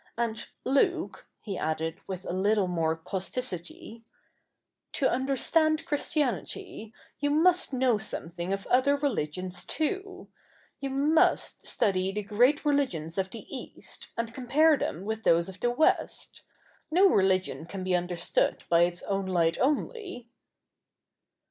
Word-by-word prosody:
And, 230 -1 -2 0.2
Luke,' 330 +6 +1
he 200 -4 -5
added 160 +2 -2
with 190 -1 -6
a - - -3
little 200 +2 +2
more 165 -3 0
causticity, 190 +4 -5 0.5
' - - -57
to 270 - +2
understand 310 +5 +1
Christianity, 285 -7 -2 0.3
you 290 - 0
must 340 +4 +3
know 255 -4 +2
something 175 -4 -4
of 195 0 -2
other 275 +3 +3
religions 185 - -2
too. 380 +5 -3 0.5
You 275 -1 -3
must 290 +4 +2
study 190 -1 +1
the 210 +1 -3
great 245 +10 +2
religions 200 - 0
of 190 0 -1
the 220 0 -9
East, 255 - -9
and 230 0 -3
compare 290 +6 +4
them 190 - -4
with 220 +1 -3
those 170 0 +3
of 190 0 -10
the 240 - +1
West. 270 +6 0 0.5
No 365 +5 +5
religion 190 - +1
can 190 +2 -6
be 185 -1 +1
understood 175 -1 0
by 170 0 +5
its 175 0 -5
own 195 -1 -2
light 170 -3 +1
only.' 300 - -2
220 Hz, 135 wpm, -28 LUFS, 185-280 Hz, 0.5 s, No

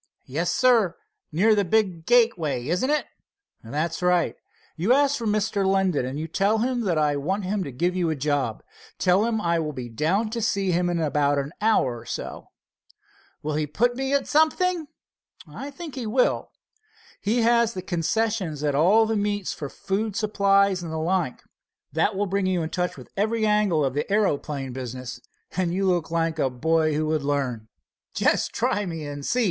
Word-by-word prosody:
"Yes, 165 +7 -1
sir, 235 -8 +3 0.3
near 200 +8 +4
the 205 -1 +2
big 185 -4 0
gateway, 180 - +2
isn't 180 - 0
it?" 300 0 +1 0.6
"That's 155 +9 -3
right. 180 -1 +2 0.4
You 185 +9 +2
ask 285 +1 +3
for 230 -4 -3
Mr. 210 -1 +1
Linden, 190 -8 +1
and 150 +5 -5
tell 205 +3 +2
him 240 -1 0
I 150 -3 +2
want 190 +8 -2
him 195 +1 -1
to 140 - -6
give 175 +9 -1
you 175 -3 +1
a 160 - 0
job. 140 -5 -1 0.3
Tell 185 +4 +3
him 230 -1 0
I 170 -4 +1
will 155 -2 -3
be 125 -3 -6
down 180 - 0
to 230 0 -3
see 200 -3 +1
him 175 +1 +1
about 150 -4 +1
it - - +2
in - - -5
an - - -12
hour 135 - +2
or 115 - -14
so." - - -6 1.0
"Will 155 0 -2
he 150 0 -1
put 240 +11 +1
me 270 +1 -2
at 280 - +1
something?" 315 +2 +2 0.6
"I 230 - -7
think 315 +1 -8
he 250 -4 -4
will. 250 +4 +1 0.7
He 225 +3 +1
has 235 -1 +3
the 185 - -4
concessions 180 -3 -1
at 145 -1 +1
all 190 +10 +5
the 220 0 -1
meets 205 -2 -1
for 145 - -6
food 205 +5 -3
supplies 200 -2 +2
and 165 -2 -6
the 160 - -3
like. 165 -4 -1 0.5
That 165 +6 +1
will 205 +2 0
bring 195 0 0
you 180 -3 0
in 160 - -4
touch 180 -1 -2
with - - -12
every 220 +2 +1
angle 210 -8 +2
of 130 - -1
the 145 +7 -3
aeroplane 145 -10 0
business, 125 -1 -6 0.3
and 180 -1 0
you 195 +2 0
look 175 -4 +1
like 165 -1 -1
a 135 - +2
boy 155 +4 +1
who 155 +1 0
would 155 0 0
learn." 135 -6 -2 0.5
"Just - - +2
try 205 -1 0
me 165 -3 -5
and 145 -1 -6
see!" 250 - 0
180 Hz, 190 wpm, -25 LUFS, 150-215 Hz, 1.0 s, all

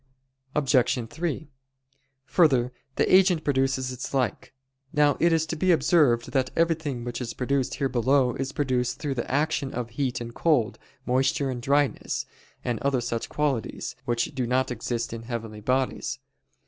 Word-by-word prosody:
Obj. 130 -4 +2
3: 160 +2 -3 0.8
Further, 130 -4 +3 0.2
the - - +4
agent 185 -4 +4
produces 130 -2 +1
its 125 +2 -5
like. 125 -4 -1 0.4
Now 150 -1 +4
it 170 +1 +4
is 160 -1 +2
to 165 - -3
be 185 +4 +2
observed 150 -8 +3
that 130 -2 +1
everything 160 -7 0
which 120 +1 -4
is 120 - -4
produced 135 0 0
here 135 - 0
below 130 +1 +2
is 135 +2 -3
produced 130 -4 0
through 145 -3 -2
the 125 - -4
action 145 -1 0
of 120 -1 -4
heat 130 +1 -1
and 120 0 -6
cold, 135 -9 +1 0.3
moisture 135 +2 +1
and 125 -1 -5
dryness, 140 +2 +1 0.4
and 120 -3 -1
other 135 0 +1
such 115 -1 -3
qualities, 135 -4 -2
which 120 +1 -1
do 130 -3 -1
not 130 +1 +1
exist 120 0 -3
in 115 - -5
heavenly 115 -2 -6
bodies. 130 +4 -1
130 Hz, 160 wpm, -26 LUFS, 120-145 Hz, 0.8 s, the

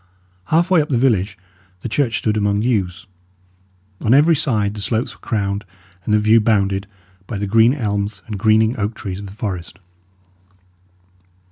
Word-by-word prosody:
Half 170 - +1
way 175 -4 +5
up 150 - -4
the 130 - +1
village, 105 -6 +1 0.4
the - - -4
church 120 -1 0
stood 110 -1 0
among 105 0 +1
yews. 100 -5 -1 1.0
On 115 +4 +4
every 160 +4 +5
side 105 -8 0
the 105 - -7
slopes 110 +3 -1
were - - -21
crowned 100 -2 -2 0.4
and - - -2
the 105 - +5
view 110 +2 +4
bounded 100 -2 +1 0.4
by 110 - -4
the 100 - -2
green 115 +5 +4
elms 100 -5 -3
and 105 -3 -6
greening 110 +2 +3
oak 105 +2 -2
trees 100 -4 -6
of 100 - -8
the - - -10
forest. 95 -4 -5
105 Hz, 165 wpm, -19 LUFS, 100-115 Hz, 1.0 s, way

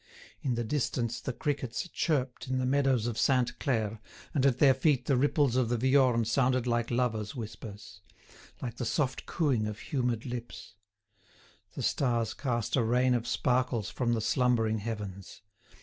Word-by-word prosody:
In 130 -4 0
the 120 - -1
distance 120 -2 -1
the - - -3
crickets 135 0 -3
chirped 135 -9 -1
in 130 0 -1
the 130 - 0
meadows 135 -3 +2
of 115 -1 -2
Sainte 125 -1 +2
Claire, 110 -6 -1 0.3
and 140 -3 +3
at 130 -3 +2
their 135 -1 +6
feet 130 -1 +1
the 140 - +2
ripples 140 -1 +2
of 125 -3 +2
the 120 - +1
Viorne 130 -2 +3
sounded 125 +2 +2
like 120 -1 0
lovers' 120 -2 -1
whispers—like 110 +2 -10
the - - -3
soft 130 +2 -1
cooing 135 -10 +1
of 105 0 -5
humid 120 -5 -2
lips. 120 -2 -7 1.0
The - - -4
stars 120 -5 +1
cast 120 -5 -1
a 130 - +3
rain 125 +3 +3
of 120 -1 -1
sparkles 125 -3 0
from 120 -2 0
the 115 - 0
slumbering 115 -1 +2
heavens. 100 -3 -6
125 Hz, 160 wpm, -30 LUFS, 115-130 Hz, 1.0 s, their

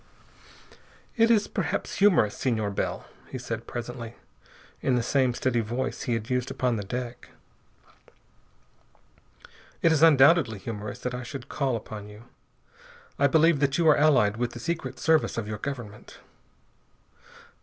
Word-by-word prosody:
"It 230 0 +4
is 215 -3 +3
perhaps - - -3
humorous, 175 - +4
Senor 110 -5 -1
Bell," 100 - -3 0.2
he 130 - -5
said 115 -2 -6
presently, 120 -1 -6 0.7
in 130 - +1
the 120 - +1
same 130 0 +2
steady 125 -2 0
voice 120 +4 -3
he 120 - -1
had 110 -1 -4
used 125 -1 -1
upon 125 -2 0
the 105 - -4
deck. 120 +4 -6 2.5
"It 165 - +5
is 160 -2 +2
undoubtedly 145 -5 +5
humorous 105 +1 -6
that 125 - -3
I 125 - -4
should 125 0 -8
call 135 -4 -1
upon 105 -2 -7
you. 105 +2 -13 1.0
I 140 - +5
believe 160 +1 +4
that 140 -1 +1
you 170 -2 +2
are 150 - +7
allied 135 -9 +3
with 120 0 -2
the 120 - -8
Secret 170 +4 -4
Service 160 -5 +2
of 110 -2 -3
your 105 -1 -5
government." 120 -7 -7
125 Hz, 145 wpm, -26 LUFS, 115-145 Hz, 2.5 s, are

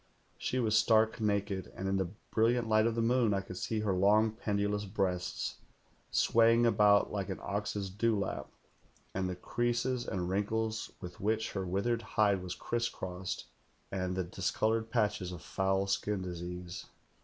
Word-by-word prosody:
Slie 130 -1 0
was 110 -1 +2
stark 110 0 +4
naked, 100 -2 -1
and 95 - -4
in 95 0 +1
the 95 -3 -1 0.2
brilliant 115 +1 +2
light 110 0 +4
of 115 - 0
the 115 - +1
moon 115 -3 +3
I 95 - 0
could 95 -2 -8
see 110 +3 -1
her 105 -3 +1
long, 105 +4 +4
pendulous 105 -2 -1
breasts 95 -3 -2 0.5
swaying 115 +1 +4
about 105 -2 +5
like 100 -1 -3
an 95 - -3
ox's 100 -1 -3
dew 110 +2 +1
lap, 100 - -3 0.6
and 95 -1 -1
the 90 - -3
creases 120 +6 -1
and 90 -2 -2
wrinkles 110 +3 -1
with 90 -2 -8
which 110 +2 0
her 95 -2 -3
withered 115 +6 0
hide 105 -4 +2
was 90 -1 -5
criss 120 0 -1
crossed, 90 0 -5 0.5
and 95 -1 -2
the 95 - 0
discoloured 110 +5 0
patches 105 -5 0
of 90 -3 -8
foul 95 0 0
skin 100 0 -1
disease. 90 0 -6
105 Hz, 165 wpm, -32 LUFS, 95-110 Hz, 0.6 s, about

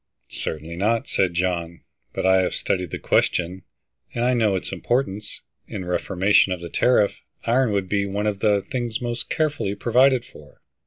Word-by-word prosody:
"Certainly 80 +2 -5
not," 110 +4 +1
said 90 -3 +1
John. 85 -1 -1 0.3
"But - - -3
I 95 0 +5
have 90 - -1
studied 90 -3 -1
the - - -4
question, 90 +2 +1 0.5
and 120 0 0
I 125 - +3
know 110 -5 +2
its 95 - -4
importance. 105 +1 -2 0.3
In 95 - -5
a - - -9
reformation 95 +2 +2
of 90 - -2
the 85 0 -7
tariff, 115 -1 +2 0.2
iron 125 0 +2
would 100 -2 0
be 100 +1 0
one 100 +2 -2
of 105 -2 -1
the 100 -2 +2
things 120 -3 -3
most 120 -1 -3
carefully 150 -10 -1
provided 125 +4 +3
for." - - -16
100 Hz, 175 wpm, -23 LUFS, 90-120 Hz, 0.5 s, I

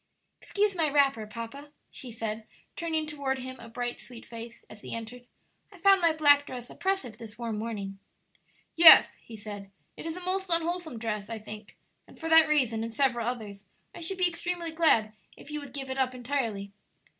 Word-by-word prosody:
"Excuse 410 0 0
my 325 -4 +1
wrapper, 275 -6 +2
papa," 230 +7 -8 0.2
she 250 - -8
said, 220 -1 -5 0.3
turning 320 -2 -2
toward 280 -3 -2
him 260 0 -7
a 230 - -11
bright, 240 +1 -4
sweet 240 -2 -12
face, 230 0 -9
as 215 - -13
he - - -6
entered; 240 +2 -8 0.4
"I 390 - -15
found 390 +1 +5
my 335 -1 +5
black 290 -2 +5
dress 245 -1 -7
oppressive 380 - -2
this 220 -2 -10
warm 230 -3 -3
morning." 200 -3 -5 0.8
"Yes," 330 -1 +9
he 225 - -11
said; 205 -1 -8 0.3
"it - - -7
is 325 +2 -4
a - - -7
most 380 +1 -2
unwholesome 335 -4 -1
dress, 215 -2 -3
I 230 - -4
think; 215 0 -10 0.3
and - - -17
for 325 - -4
that 320 -1 +7
reason 250 -7 +2
and 230 0 -4
several 240 -2 +1
others 210 -5 -5 0.3
I - - -9
should 345 +3 -2
be 365 -1 +5
extremely 345 0 -3
glad 310 -10 +3 0.2
if 295 - -12
you 300 - -3
would 285 -2 -10
give 270 -1 -5
it 265 - -3
up 255 -1 +1
entirely." 230 -6 -3
255 Hz, 190 wpm, -28 LUFS, 225-320 Hz, 0.8 s, Yes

